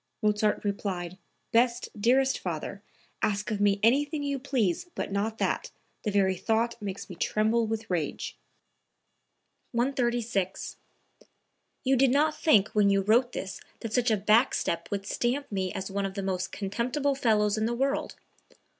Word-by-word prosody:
Mozart 210 Hz, 0 st, +2 dB
replied: 185 Hz, -3 st, -3 dB, 0.3 s
"Best, 235 Hz, +1 st, +2 dB
dearest 260 Hz, +5 st, +3 dB
father, 180 Hz, +3 st, -4 dB, 0.4 s
ask 205 Hz, +2 st, 0 dB
of 205 Hz, -1 st, -1 dB
me 200 Hz, -1 st, +3 dB
anything 290 Hz, +6 st, +3 dB
you 280 Hz, -1 st, -1 dB
please 255 Hz, -, 0 dB
but -, -, -3 dB
not 210 Hz, +3 st, -1 dB
that; -, -, -1 dB, 0.3 s
the 215 Hz, -, -2 dB
very 195 Hz, -2 st, +2 dB
thought 225 Hz, +5 st, 0 dB
makes 200 Hz, -1 st, -5 dB
me 180 Hz, -, -8 dB
tremble 220 Hz, +5 st, +1 dB
with 225 Hz, 0 st, -3 dB
rage.") 170 Hz, -5 st, -2 dB, 1.4 s
136. 240 Hz, -6 st, -1 dB, 1.1 s
"You 270 Hz, +1 st, +3 dB
did 265 Hz, +1 st, +4 dB
not 295 Hz, +4 st, +3 dB
think 215 Hz, -10 st, +4 dB
when 210 Hz, -1 st, +3 dB
you 195 Hz, 0 st, +3 dB
wrote 235 Hz, +5 st, +3 dB
this 195 Hz, +1 st, -5 dB, 0.2 s
that 230 Hz, -1 st, -5 dB
such 245 Hz, -1 st, +2 dB
a 220 Hz, -, +3 dB
back 215 Hz, +5 st, +4 dB
step 170 Hz, -, -2 dB
would 200 Hz, -1 st, -3 dB
stamp 245 Hz, +6 st, -1 dB
me 190 Hz, -2 st, -1 dB
as 195 Hz, 0 st, -5 dB
one 200 Hz, 0 st, -1 dB
of 190 Hz, -, -9 dB
the 200 Hz, -, -3 dB
most 185 Hz, -1 st, -2 dB
contemptible 245 Hz, +8 st, -1 dB
fellows 215 Hz, -5 st, +2 dB
in 220 Hz, 0 st, 0 dB
the 240 Hz, -, -1 dB
world. 275 Hz, +3 st, -1 dB
215 Hz, 155 wpm, -28 LUFS, 195-245 Hz, 1.4 s, did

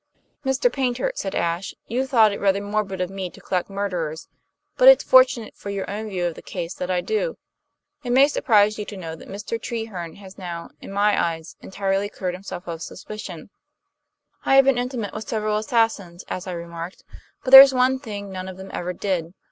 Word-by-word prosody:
"Mr. 265 Hz, -, +1 dB
Paynter," 260 Hz, -, 0 dB
said 195 Hz, -, -4 dB
Ashe, 170 Hz, +3 st, -2 dB
"you 255 Hz, +4 st, -1 dB
thought 225 Hz, -5 st, +5 dB
it -, -, -5 dB
rather 200 Hz, 0 st, +2 dB
morbid 205 Hz, -2 st, -2 dB
of 180 Hz, 0 st, -2 dB
me 190 Hz, -2 st, -4 dB
to -, -, -15 dB
collect 180 Hz, 0 st, -2 dB
murderers; 180 Hz, -6 st, -3 dB, 0.5 s
but -, -, +5 dB
it's -, -, +9 dB
fortunate 255 Hz, -3 st, +4 dB
for 200 Hz, -, -8 dB
your 200 Hz, -1 st, -3 dB
own 215 Hz, +2 st, -5 dB
view 180 Hz, -3 st, -2 dB
of 170 Hz, -, -1 dB
the -, -, -12 dB
case 175 Hz, -1 st, -5 dB
that 180 Hz, -, -5 dB
I 180 Hz, -1 st, +1 dB
do. 460 Hz, -, -2 dB, 0.7 s
It 245 Hz, -, -5 dB
may 265 Hz, +3 st, +6 dB
surprise 215 Hz, -7 st, +3 dB
you 210 Hz, -, -3 dB
to 205 Hz, -, -8 dB
know 165 Hz, -3 st, -6 dB
that -, -, -13 dB
Mr. 210 Hz, +3 st, -5 dB
Treherne 205 Hz, -8 st, -5 dB
has 195 Hz, -1 st, -13 dB
now, 170 Hz, -2 st, -6 dB
in -, -, -10 dB
my 205 Hz, +1 st, +2 dB
eyes, 165 Hz, -1 st, -4 dB
entirely 195 Hz, +1 st, -1 dB
cleared 185 Hz, -3 st, -4 dB
himself 185 Hz, -1 st, -7 dB
of 165 Hz, -1 st, -5 dB
suspicion. 195 Hz, -2 st, -8 dB, 0.9 s
I 270 Hz, -, +3 dB
have 270 Hz, 0 st, +7 dB
been 270 Hz, -2 st, +3 dB
intimate 245 Hz, -4 st, -3 dB
with 215 Hz, -1 st, -6 dB
several 215 Hz, -1 st, 0 dB
assassins, 215 Hz, -6 st, 0 dB
as 185 Hz, +1 st, -5 dB
I 185 Hz, -, -3 dB
remarked; 170 Hz, +1 st, -7 dB, 0.4 s
but 255 Hz, -, -3 dB
there's 270 Hz, 0 st, +12 dB
one 260 Hz, 0 st, +2 dB
thing 205 Hz, -6 st, -7 dB
none 185 Hz, 0 st, -6 dB
of 185 Hz, -1 st, -8 dB
them 190 Hz, 0 st, -9 dB
ever 180 Hz, +1 st, -3 dB
did. 180 Hz, -3 st, -3 dB
200 Hz, 200 wpm, -23 LUFS, 180-230 Hz, 0.9 s, there's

